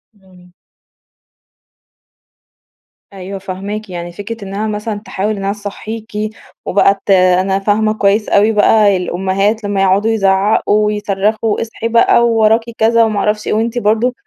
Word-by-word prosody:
إمم. 185 -2 -21 2.6
أيوه 195 +1 -7
فاهماكِ، 195 +2 -6
يعني 175 -1 -6
فكرة 205 +3 -7
إنّها 200 +3 -4
مثلًا 210 0 -4
تحاول 210 +3 -2
إنّها 195 0 -2
تصَحّيكِ، 215 +2 -8 0.5
وبقى 200 0 +2
ت 200 - 0
أنا 185 +1 +3
فاهمة 215 +2 +1
كويّس 205 0 +1
أوي 210 +2 +3
بقى، 210 -2 +3
الأمهات 195 +4 -1
لمّا 200 -1 -1
يقعدوا 195 +4 +2
يزعَّقوا، 205 +1 +2
ويصرَّخوا، 210 +1 -1
اصحي 230 0 -4
بقى، 235 +1 +3
ووراكِ 225 0 +3 0.2
كذا 230 +1 +3
وما 215 -2 0
اعرفش 210 0 -1
إيه، - - 0
وأنتِ 230 +2 -1
برضو 225 +3 +1
205 Hz, 130 wpm, -15 LUFS, 195-220 Hz, 2.6 s, أنا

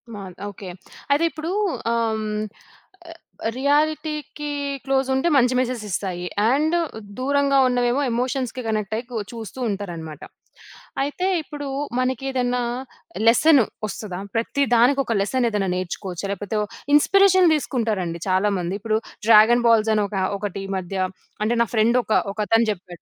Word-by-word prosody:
Mann 190 -3 -8
okay. 200 -1 -9 0.4
అయితే 290 +3 +3
ఇప్పుడు 315 +4 -5 0.4
ఆహ్, 230 -1 0
హ్మ్. 215 - -3 0.8
ఆహ్, 330 -8 -7
రియాలిటీకి 300 +1 0 0.3
క్లోజుంటే 265 +2 +1
మంచి 250 -1 +4
మెసెజీస్తాయి. 205 -7 -3 0.2
అండు 310 +6 +2 0.4
దూరంగా 280 +1 +2
ఉన్నవేమో 245 +2 +1
ఎమోషన్స్‌కి 255 +1 -2
కనెక్ట్ 215 -1 -1
అయ్యి 240 +2 -6
కు 235 - -3
చూస్తూంటారనమాట. 200 - -5 0.8
అయితే, 290 +6 -2 0.2
ఇప్పుడు 290 -1 -7 0.3
మనకేద‌న్నా 255 -1 0 0.7
లెస్సను 275 +3 +6 0.2
ఒస్తదా? 200 -3 -6 0.2
ప్రతి 230 +5 0
దానికి 250 +4 +4
ఒక 230 - -1
లెసన్ 245 +5 0
ఏద‌న్నా 205 -3 -1
నేర్చుకోవచ్చా? 185 0 -4
లేకపోతే 205 +2 -3
ఓ - - -1 0.3
ఇన్స్‌పిరేషన్ 375 +3 +5
దీసుకుంటారండి 215 - -1
చాలామంది. 185 -1 +1
ఇప్పుడు 215 0 +1 0.3
డ్రాగన్ 230 +2 +7
బాల్స్ 225 -1 +4
అని 210 - +2
ఒక 200 - -7 0.2
ఒకటి 200 -1 -4
ఈ - - -11
మధ్య 185 +1 -5 0.5
అంటే 220 +2 +1
నా - - -5
ఫ్రెండ్ 225 +3 +4
ఒక 220 - -1 0.2
ఒకతని 220 +2 +2
జెప్పాడు. 180 -3 -9
230 Hz, 130 wpm, -22 LUFS, 205-270 Hz, 0.8 s, డ్రాగన్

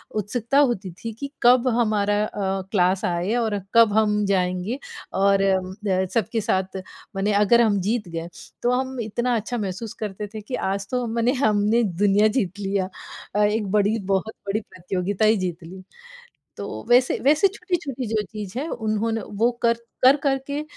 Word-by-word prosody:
उत्सुकता 230 +5 -1
होती 235 -9 +1
थी 230 - -4
कि 280 0 -5
कब 245 +1 +5
हमारा 210 -2 +2
अ, 195 -2 -2
क्लास 185 -1 +2
आए 175 +6 0
और 210 -2 -1
कब 230 -3 +6
हम 210 -1 +2
जाएँगे। 185 +4 0 0.4
और 195 0 +4
अम, 190 -1 +1
द 190 -1 +1
सबके 230 0 0
साथ 190 -1 -1 0.4
मने 195 +2 0
अगर 210 +4 +5
हम 210 -4 +3
जीत 210 +1 -1
गए, 165 0 -5 0.4
तो 240 - +3
हम 260 0 -1
इतना 240 +3 -1
अच्छा 230 +3 -2
महसूस 205 +1 -4
करते 210 0 -4
थे 215 - -6
कि 230 +5 -5
आज 195 0 -3
तो 250 -1 0
मने 235 +1 +2
हमने 215 0 +3
दुनिया 205 +2 +3
जीत 195 -3 -1
लिया 195 -1 -1 0.5
अ, 210 - +3
एक 210 0 +1
बड़ी 210 +1 +2 0.2
बहुत 205 +3 -1
बड़ी 200 +2 0
प्रतियोगिता 185 +2 -2
ही 215 0 +4
जीत 180 -2 -3
ली। 185 +3 -10 0.7
तो - - -6
वैसे 250 +1 +4
वैसे 305 +7 +5
छोटी-छोटी 345 - -3
जो 215 0 0
चीज़ 210 0 -6
है, 300 - -3
उन्होंने 220 -1 -1 0.2
वो 240 +2 +4
कर 235 -1 +4 0.3
कर-कर 270 +1 +5
के 290 +1 -3
210 Hz, 170 wpm, -23 LUFS, 195-235 Hz, 0.7 s, कब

